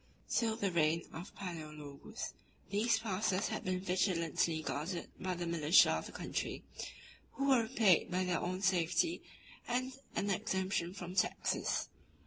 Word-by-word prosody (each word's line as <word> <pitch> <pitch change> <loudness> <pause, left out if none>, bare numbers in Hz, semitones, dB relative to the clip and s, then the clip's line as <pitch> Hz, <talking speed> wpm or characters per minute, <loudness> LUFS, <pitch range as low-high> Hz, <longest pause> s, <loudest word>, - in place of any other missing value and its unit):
Till 225 -2 +1
the 200 -4 0
reign 165 0 +2
of 170 +4 -8
Palæologus, 150 -6 -6 0.4
these 220 +3 +3
passes 200 -3 0
had - - -3
been 185 0 0
vigilantly 170 -3 +1
guarded 165 +5 -3
by 185 -1 -1
the 175 0 -3
militia 170 0 +6
of - - -1
the - - -9
country, - - -3 0.7
who 275 0 0
were 260 -3 +6
repaid 220 -6 +4
by 180 +1 +1
their 180 -2 +1
own 185 +2 -2
safety 190 - +2 0.5
and 255 +2 0 0.2
an 200 - +1
exemption 190 -3 -1
from 180 -2 -6
taxes. 185 - +1
185 Hz, 140 wpm, -35 LUFS, 170-205 Hz, 0.7 s, militia